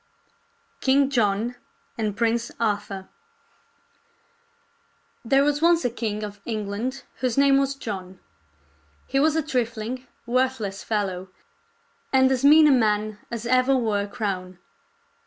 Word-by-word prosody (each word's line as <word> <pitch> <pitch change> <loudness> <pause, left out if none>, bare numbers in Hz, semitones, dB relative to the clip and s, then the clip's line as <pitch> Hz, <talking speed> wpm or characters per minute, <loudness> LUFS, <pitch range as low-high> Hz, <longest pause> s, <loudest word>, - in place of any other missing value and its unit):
KING 275 +1 +3
JOHN 230 0 0 0.4
AND 210 -3 -2
PRINCE 230 0 0
ARTHUR 205 -3 -2 2.2
There 270 +4 +3
was 295 0 +1
once 340 -2 +4
a 245 - +1
king 215 -3 -3
of 205 -1 -7
England 220 +4 -4
whose 255 -2 -1
name 275 0 +5
was 275 0 0
John. 190 -8 -7 0.9
He 270 - 0
was 310 +2 +3
a 320 - +1
trifling, 245 -1 -3 0.2
worthless 240 -5 -1
fellow, 190 -4 -2 0.8
and 260 0 +4
as 260 -1 0
mean 305 +2 +8
a 295 - +6
man 215 -4 +1
as 235 -1 -5
ever 255 +2 +3
wore 220 -5 +1
a 200 - -4
crown. 190 -5 -4
235 Hz, 125 wpm, -24 LUFS, 210-265 Hz, 2.2 s, mean